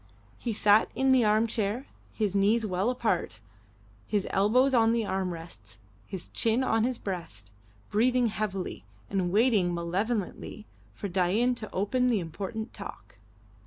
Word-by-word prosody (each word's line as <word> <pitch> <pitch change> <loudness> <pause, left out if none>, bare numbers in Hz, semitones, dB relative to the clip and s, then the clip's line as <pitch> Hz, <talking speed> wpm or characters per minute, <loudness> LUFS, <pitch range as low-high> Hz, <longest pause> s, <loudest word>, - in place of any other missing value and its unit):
He 235 - -2
sat 210 0 +4
in 265 0 +3
the 255 -2 +5
arm 215 +1 +3
chair, 225 +3 -2 0.3
his 210 -4 -1
knees 210 +3 +3
well 190 +3 0
apart, 220 - -1 0.7
his 205 -2 0
elbows 250 +7 +3
on 230 -2 +4
the 230 -2 0
arm 190 -1 -1
rests, 165 - -10 0.3
his 190 -3 -6
chin 230 +3 +1
on 225 -3 +2
his 250 -1 -1
breast, 165 - -6 0.4
breathing 245 +3 +3
heavily 210 -4 -3 0.3
and 185 -3 0
waiting 205 -5 +3
malevolently 200 +4 -3 0.3
for 200 - -4
Dain 195 +7 +2
to 225 -3 -7
open 250 +6 +1
the 235 -4 +2
important 200 +7 -5
talk. 105 - -10
210 Hz, 145 wpm, -28 LUFS, 185-230 Hz, 0.7 s, the